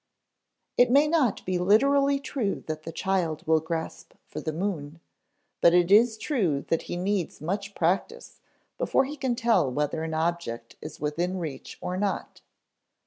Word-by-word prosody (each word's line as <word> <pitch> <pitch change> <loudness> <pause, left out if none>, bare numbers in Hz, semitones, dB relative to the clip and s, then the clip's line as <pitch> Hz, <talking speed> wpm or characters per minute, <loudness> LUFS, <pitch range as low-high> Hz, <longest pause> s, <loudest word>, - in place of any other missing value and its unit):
It 245 0 +5
may 285 +4 +5
not 300 -8 +1
be 185 -1 0
literally 275 +9 +4
true 255 -7 -3
that 155 -1 -4
the 165 - -7
child 175 -3 -1
will 160 0 +4
grasp 160 +1 -5
for - - -7
the 160 - -2
moon, 160 -3 -4 0.6
but 170 0 +6
it 175 +1 +3
is 220 +2 +6
true 195 - 0
that 165 - +1
he 175 - -2
needs 190 -1 -1
much 195 +5 -4
practice 195 - -1 0.4
before - - +2
he 290 +3 -6
can 260 -4 -1
tell 230 - +2
whether 150 +4 -1
an 160 -1 -3
object 160 -8 -2
is 155 0 -8
within 170 +5 -1
reach 155 -7 -6
or 180 - -3
not. 200 0 -3
180 Hz, 160 wpm, -27 LUFS, 160-230 Hz, 0.6 s, but